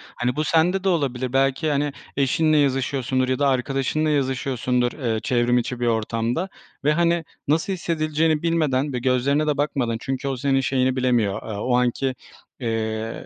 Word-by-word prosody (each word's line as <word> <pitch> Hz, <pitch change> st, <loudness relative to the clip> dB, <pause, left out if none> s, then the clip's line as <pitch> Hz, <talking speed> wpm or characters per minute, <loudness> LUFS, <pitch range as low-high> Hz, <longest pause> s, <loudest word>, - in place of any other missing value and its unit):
Hani, 125 Hz, +2 st, -1 dB
bu 155 Hz, -, 0 dB
sende 175 Hz, +5 st, +2 dB
de 195 Hz, -, +2 dB
olabilir. 130 Hz, -6 st, -1 dB
Belki, 135 Hz, +3 st, +2 dB
hani, 145 Hz, 0 st, 0 dB, 0.2 s
eşinle 155 Hz, +3 st, +2 dB
yazışıyorsundur 130 Hz, -2 st, +1 dB
ya 130 Hz, -, 0 dB
da 140 Hz, -, +3 dB
arkadaşınla 135 Hz, +4 st, 0 dB
yazışıyorsundur, 130 Hz, -3 st, 0 dB
eee, 115 Hz, -6 st, -2 dB
çevrim 120 Hz, -3 st, +2 dB
içi 125 Hz, 0 st, -2 dB
bir 120 Hz, -, 0 dB
ortamda 115 Hz, -, -1 dB, 0.3 s
ve, 150 Hz, -, +3 dB
hani, 170 Hz, +1 st, +2 dB, 0.2 s
nasıl 165 Hz, +7 st, +1 dB
hissedileceğini 155 Hz, -3 st, 0 dB
bilmeden 150 Hz, -5 st, +1 dB
ve 125 Hz, -, -1 dB
gözlerine 135 Hz, +4 st, +1 dB
de 150 Hz, -, +1 dB
bakmadan 130 Hz, -6 st, 0 dB
çünkü 135 Hz, +1 st, -3 dB
o 135 Hz, -1 st, -2 dB
senin 135 Hz, +1 st, +1 dB
şeyini 130 Hz, -1 st, +1 dB
bilemiyor, 120 Hz, -6 st, +1 dB
eee, 110 Hz, -, -4 dB
o 125 Hz, +4 st, 0 dB
anki, 125 Hz, +1 st, 0 dB, 0.4 s
eee, 110 Hz, -2 st, -3 dB
135 Hz, 165 wpm, -23 LUFS, 125-150 Hz, 0.4 s, da